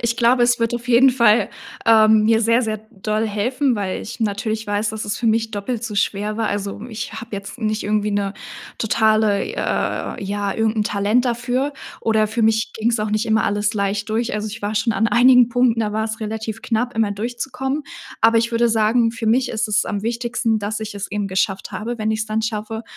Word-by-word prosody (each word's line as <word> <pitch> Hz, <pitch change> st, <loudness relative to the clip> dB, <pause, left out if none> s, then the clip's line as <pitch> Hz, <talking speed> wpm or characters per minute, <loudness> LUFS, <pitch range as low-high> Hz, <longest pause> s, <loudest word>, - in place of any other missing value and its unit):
Ich 235 Hz, 0 st, -1 dB
glaube, 240 Hz, +1 st, +3 dB
es 240 Hz, 0 st, +3 dB
wird 230 Hz, 0 st, 0 dB
auf 240 Hz, +1 st, -6 dB
jeden 250 Hz, +2 st, +6 dB
Fall, 235 Hz, -3 st, +4 dB, 0.4 s
ähm, 220 Hz, -1 st, +5 dB
mir 225 Hz, 0 st, +4 dB
sehr, 230 Hz, +2 st, +3 dB
sehr 215 Hz, -1 st, -2 dB
doll 215 Hz, +1 st, -2 dB
helfen, 245 Hz, +5 st, 0 dB
weil 195 Hz, -2 st, -3 dB
ich 240 Hz, +3 st, -8 dB
natürlich 220 Hz, +1 st, -2 dB
weiß, 205 Hz, +1 st, 0 dB
dass 220 Hz, 0 st, -5 dB
es 205 Hz, -, -3 dB
für 235 Hz, -, -2 dB
mich 225 Hz, 0 st, +1 dB
doppelt 220 Hz, +3 st, -4 dB
so 215 Hz, -, -5 dB
schwer 205 Hz, +1 st, -1 dB
war. 225 Hz, -1 st, 0 dB
Also, 205 Hz, 0 st, -3 dB
ich 220 Hz, -2 st, -6 dB
habe 230 Hz, -, -8 dB
jetzt 200 Hz, +4 st, -8 dB
nicht 215 Hz, -1 st, -1 dB
irgendwie 210 Hz, 0 st, 0 dB
'ne 200 Hz, -1 st, -1 dB, 0.5 s
totale, 215 Hz, -2 st, +2 dB
äh, -, -, -2 dB
ja, 200 Hz, 0 st, -2 dB
irgend 225 Hz, 0 st, 0 dB
'n -, -, +3 dB
Talent 210 Hz, +4 st, +1 dB
dafür, 250 Hz, +3 st, -1 dB, 0.3 s
oder 220 Hz, -1 st, +2 dB
für 225 Hz, +2 st, -2 dB
mich 220 Hz, 0 st, +2 dB
ging's 230 Hz, +1 st, 0 dB
auch 210 Hz, 0 st, -2 dB
nicht 215 Hz, +1 st, 0 dB
immer 220 Hz, 0 st, +2 dB
alles 205 Hz, +2 st, 0 dB
leicht 200 Hz, +1 st, -1 dB
durch. 230 Hz, +2 st, -1 dB
Also, 210 Hz, 0 st, -2 dB
ich 215 Hz, +1 st, -9 dB
war 205 Hz, +1 st, -2 dB
schon 220 Hz, +2 st, +1 dB
an 220 Hz, +2 st, +1 dB
einigen 250 Hz, 0 st, +6 dB
Punkten, 245 Hz, -1 st, +2 dB
da 210 Hz, -2 st, -1 dB
wars 220 Hz, +1 st, -2 dB
relativ 220 Hz, 0 st, -4 dB
knapp 240 Hz, +2 st, -1 dB
immer 220 Hz, -2 st, +2 dB
durchzukommen. 260 Hz, +6 st, -3 dB, 0.4 s
Aber 230 Hz, +1 st, +5 dB
ich 230 Hz, +1 st, 0 dB
würde 235 Hz, 0 st, +2 dB
sagen, 225 Hz, +1 st, +2 dB
für 225 Hz, -1 st, -5 dB
mich 245 Hz, +3 st, +2 dB
ist 220 Hz, -1 st, -1 dB
es 210 Hz, 0 st, +2 dB
am 200 Hz, -1 st, -3 dB
wichtigsten, 235 Hz, -1 st, -1 dB
dass 210 Hz, +1 st, -3 dB
ich 215 Hz, -1 st, -6 dB
es 200 Hz, 0 st, -6 dB
eben 205 Hz, -1 st, -2 dB
geschafft 190 Hz, +1 st, -1 dB
habe, 220 Hz, +5 st, -4 dB
wenn 215 Hz, 0 st, -1 dB
ich's 220 Hz, 0 st, -1 dB
dann 215 Hz, +1 st, -1 dB
schaffe. 220 Hz, 0 st, -3 dB
220 Hz, 215 wpm, -20 LUFS, 210-235 Hz, 0.5 s, jeden